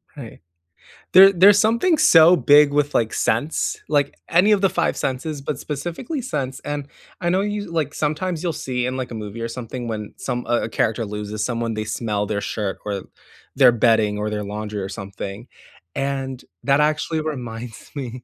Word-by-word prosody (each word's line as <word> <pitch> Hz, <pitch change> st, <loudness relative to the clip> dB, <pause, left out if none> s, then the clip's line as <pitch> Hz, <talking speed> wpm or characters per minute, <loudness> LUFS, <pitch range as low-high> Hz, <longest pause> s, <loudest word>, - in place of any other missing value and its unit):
Right. 125 Hz, -6 st, -10 dB, 0.7 s
There 195 Hz, +2 st, +9 dB
there's 195 Hz, +3 st, +6 dB
something 235 Hz, +10 st, +3 dB
so 165 Hz, -3 st, +7 dB
big 145 Hz, -2 st, +5 dB
with, 145 Hz, 0 st, +1 dB
like, 115 Hz, -1 st, +1 dB
scents, 145 Hz, +9 st, 0 dB
like, 145 Hz, -2 st, +1 dB
any 180 Hz, +5 st, +4 dB
of 205 Hz, -2 st, +3 dB
the 195 Hz, -, +4 dB
5 175 Hz, -2 st, 0 dB
senses, 140 Hz, +3 st, -3 dB
but 140 Hz, -1 st, -4 dB
specifically 175 Hz, -, -4 dB
scents, 135 Hz, -, -4 dB
and 145 Hz, -1 st, -4 dB, 0.3 s
I 175 Hz, -, 0 dB
know 185 Hz, +2 st, +2 dB
you 205 Hz, -2 st, -3 dB
like, 155 Hz, -3 st, -1 dB
sometimes 155 Hz, +3 st, -2 dB
you'll 170 Hz, -, -1 dB
see 130 Hz, -5 st, -3 dB
in, 130 Hz, +1 st, -2 dB
like, 125 Hz, -2 st, -4 dB
a -, -, -5 dB
movie 105 Hz, +1 st, -7 dB
or 115 Hz, -, -2 dB
something 120 Hz, 0 st, -6 dB
when 105 Hz, -2 st, -5 dB
some, 125 Hz, -2 st, -4 dB
uh 120 Hz, 0 st, +1 dB
a 115 Hz, -, -3 dB
character 110 Hz, +1 st, 0 dB
loses 105 Hz, +1 st, -4 dB
someone, 115 Hz, -1 st, -2 dB
they 110 Hz, 0 st, -3 dB
smell 105 Hz, -1 st, -2 dB
their 100 Hz, 0 st, -2 dB
shirt 105 Hz, -2 st, -3 dB
or 100 Hz, -2 st, -3 dB, 0.5 s
their 130 Hz, -3 st, +7 dB
bedding 110 Hz, -3 st, +2 dB
or 105 Hz, -, -2 dB
their 105 Hz, -1 st, -3 dB
laundry 105 Hz, +1 st, -5 dB
or 95 Hz, -, -4 dB
something, 100 Hz, +3 st, -7 dB, 0.5 s
and 135 Hz, -2 st, -3 dB, 0.2 s
that 140 Hz, 0 st, +3 dB
actually 155 Hz, +1 st, +1 dB
reminds 120 Hz, -6 st, -6 dB
me 125 Hz, -2 st, -6 dB
130 Hz, 185 wpm, -21 LUFS, 110-155 Hz, 0.7 s, There